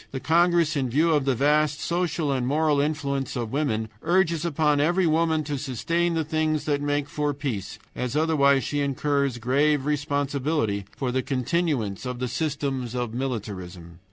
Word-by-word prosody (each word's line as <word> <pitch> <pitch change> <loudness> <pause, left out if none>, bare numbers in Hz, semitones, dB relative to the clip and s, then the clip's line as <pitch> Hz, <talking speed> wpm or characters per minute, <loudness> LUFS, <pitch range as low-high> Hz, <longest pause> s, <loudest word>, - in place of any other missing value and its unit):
The 135 - -5
congress, 170 +1 +3
in 135 -3 0
view 155 +7 +2
of 145 -3 +2
the 135 -2 +2
vast 145 +2 +2
social 170 -3 -1
and 130 -2 0
moral 150 0 +2
influence 140 -3 -2
of 120 -3 -3
woman, 115 -7 -1
urges 170 -2 +2
upon 150 -3 +1
every 175 +4 +2
woman 160 -1 +2
to 145 -2 -3
sustain 165 +6 -1
the 160 - +1
things 155 -1 -1
that 145 -1 0
make 145 0 0
for 145 -1 -2
peace, 130 -9 -4 0.2
as 125 +2 -3
otherwise 140 -3 +3
she 145 - -2
incurs 140 -1 0
grave 140 +4 +2
responsibility 145 -6 -1
for 130 -3 -1
the 130 +1 0
continuance 130 - -1
of 125 -1 -4
the 125 +1 -2
systems 135 -3 -2
of 120 -2 -2
militarism. 95 -9 -5
145 Hz, 165 wpm, -25 LUFS, 130-155 Hz, 0.2 s, congress